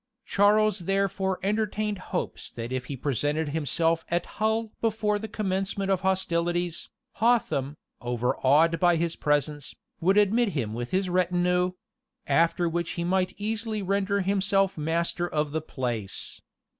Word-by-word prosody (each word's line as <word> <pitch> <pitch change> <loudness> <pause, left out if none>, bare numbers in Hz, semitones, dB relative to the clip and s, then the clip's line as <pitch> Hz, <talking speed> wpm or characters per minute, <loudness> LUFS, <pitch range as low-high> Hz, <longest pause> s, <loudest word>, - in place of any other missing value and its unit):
Charles 210 0 +3
therefore 195 +1 0
entertained 210 0 -1
hopes - - -3
that 115 +1 -6
if 130 -1 -2
he 135 +1 -5
presented 145 +4 -1
himself 165 +2 +1
at 175 0 0
Hull 220 +1 -1
before 215 -2 +1
the 220 - -5
commencement 195 -1 -2
of 190 -1 +1
hostilities, 175 -2 -1 0.3
Hotham, 200 - +1 0.2
overawed 130 +7 +2
by 175 -1 +4
his 165 0 -1
presence, 145 -1 -1 0.2
would 190 +4 +3
admit 210 +1 +3
him 110 -5 -2
with 120 +1 -4
his 190 0 0
retinue; 180 0 +1 0.5
after 165 +4 +2
which 170 0 -2
he 170 - -3
might 185 +1 0
easily 220 0 -2
render 200 +1 +1
himself 195 0 +2
master 170 +3 -1
of 150 -1 -1
the 160 +1 -1
place. 120 -9 -4
180 Hz, 135 wpm, -27 LUFS, 155-200 Hz, 0.5 s, by